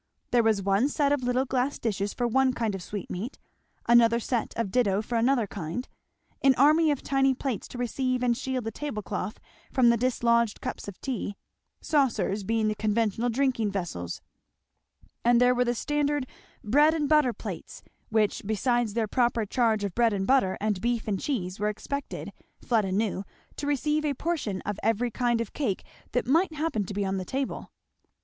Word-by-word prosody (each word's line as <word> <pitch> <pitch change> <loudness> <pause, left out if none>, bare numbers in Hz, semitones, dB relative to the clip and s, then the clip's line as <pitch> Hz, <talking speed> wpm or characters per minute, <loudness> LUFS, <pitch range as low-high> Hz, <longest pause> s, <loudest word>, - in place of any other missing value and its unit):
There 245 - +5
was 220 -3 +2
one 200 +8 +2
set 285 -1 +1
of 290 -2 +2
little 250 +1 +1
glass 260 +2 0
dishes 205 -3 -2
for 245 - -1
one 265 +2 +3
kind 225 -4 -1
of 195 - -5
sweetmeat, 205 +5 -5 0.5
another 235 0 +5
set 240 0 -1
of 230 -5 -1
ditto 205 -5 +2
for 235 - -4
another 240 0 +3
kind; 195 +5 -5 0.5
an 270 -1 +5
army 305 +5 +5
of 290 -3 -1
tiny 270 -1 +2
plates 255 -4 -3
to - - -9
receive 250 +1 -1
and 240 -1 +3
shield 260 0 -3
the 225 - -3
tablecloth 215 -6 -4 0.3
from 245 -3 +5
the 235 - +2
dislodged 235 -2 +2
cups - - -5
of 200 - -8
tea, 235 -6 -3 0.5
saucers 225 - +1
being 225 +2 +1
the 215 - +1
conventional 220 +2 0
drinking 245 -3 +1
vessels; 165 - -4 1.0
and 240 0 +5
there 250 0 +5
were 250 0 +2
the 240 0 0
standard 290 +1 0 0.4
bread 295 +9 +4
and 300 -3 0
butter 300 -4 +4
plates, - - -8 0.3
which 215 -2 +1
besides 225 +1 0
their 225 -2 +1
proper 235 -1 +1
charge 220 -1 +1
of 200 -3 -2
bread 230 0 +3
and 195 -1 -1
butter 255 -8 +3
and 210 -3 -1
beef 235 -1 -1
and 200 -3 0
cheese, 195 -9 -2
were 210 +1 +1
expected, 280 +6 -5 0.3
Fleda 215 -5 +1
knew, 200 0 0 0.3
to 285 - -4
receive 300 +2 +1
a 290 -2 0
portion 255 - -2
of 205 0 -4
every 225 +2 +1
kind 240 0 +1
of 230 -3 -4
cake 230 -11 -2 0.3
that 245 - +1
might 320 +7 +2
happen 300 -10 -1
to 200 - -6
be 200 -1 0
on 195 0 -1
the 185 - -3
table. 265 +8 -4
235 Hz, 185 wpm, -27 LUFS, 210-265 Hz, 1.0 s, There